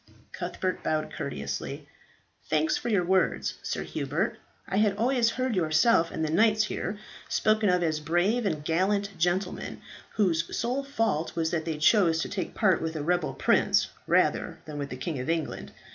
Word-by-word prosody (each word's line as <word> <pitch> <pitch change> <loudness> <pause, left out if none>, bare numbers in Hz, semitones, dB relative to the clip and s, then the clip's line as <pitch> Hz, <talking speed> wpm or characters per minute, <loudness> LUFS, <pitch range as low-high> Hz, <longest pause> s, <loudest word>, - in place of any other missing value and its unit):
Cuthbert 185 -1 -3
bowed 155 0 -1
courteously. 70 - -5 0.6
"Thanks 155 +1 +2
for - - -3
your 200 -5 +2
words, 190 +1 +1
Sir - - -3
Hubert. - - -2 0.3
I 195 - -1
had 205 -1 +2
always 240 +1 +2
heard 255 -1 -1
yourself 165 +2 +3
and 160 - -2
the 155 - -2
knights 215 +4 +4
here 205 -1 -3 0.3
spoken 215 -1 +2
of 180 -1 +2
as 155 -2 0
brave 175 +10 +1
and 155 -5 -3
gallant 200 +4 0
gentlemen, 180 +2 -1 0.4
whose 170 -6 +1
sole 250 +4 -1
fault 225 - -1
was 165 -1 0
that 160 -2 -1
they 160 -2 -2
chose 165 0 +4
to - - -5
take 190 -2 -4
part 190 -6 +3
with 160 0 -3
a 150 - -3
rebel 175 0 0
prince, - - +3 0.2
rather - - +2
than 150 -1 -6
with 140 -1 -4
the 125 - -6
King 145 +2 -3
of 130 - -4
England. 165 -3 -2
175 Hz, 175 wpm, -28 LUFS, 160-210 Hz, 0.6 s, knights